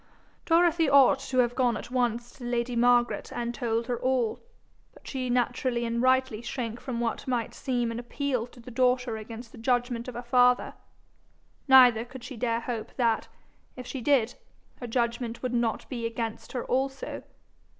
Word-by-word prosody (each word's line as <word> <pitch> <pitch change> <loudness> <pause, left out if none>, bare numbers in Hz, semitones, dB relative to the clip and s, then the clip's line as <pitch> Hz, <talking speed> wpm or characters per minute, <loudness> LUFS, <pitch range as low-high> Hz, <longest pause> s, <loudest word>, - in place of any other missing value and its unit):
Dorothy 335 -2 +4
ought 275 -1 +6
to 265 -1 -4
have 245 -1 +3
gone 245 -3 +1
at - - -9
once 240 -1 0
to - - -9
lady 240 0 -1
Margaret 240 0 +2
and 235 0 -3
told 230 -2 -1
her 245 -1 -2
all; 255 -3 0 0.6
but - - -16
she 255 -2 -3
naturally 245 0 0
and 235 0 -1
rightly 260 -3 +2
shrank 235 -1 -4
from 245 -3 -4
what 235 +1 -2
might 245 -3 -1
seem 245 -3 -1
an 230 - -4
appeal 250 -1 -2
to 245 - -17
the 240 +1 -11
daughter 250 -1 +1
against 225 +2 -8
the 240 - -12
judgment 245 0 0
of 250 - -7
her 240 - -5
father; 245 0 +3 0.9
neither 250 -4 +7
could 250 0 -11
she 265 - -7
dare 230 0 -1
hope 230 -2 -5
that, 230 -3 +1 0.5
if 250 - -8
she 265 +1 -5
did, 250 -3 +2 0.4
her 245 - -7
judgment 235 0 -2
would 250 -1 -2
not 235 -2 0
be 235 -3 -3
against 230 -1 -5
her 250 - -3
also. 270 +1 -2
245 Hz, 175 wpm, -27 LUFS, 235-255 Hz, 0.9 s, neither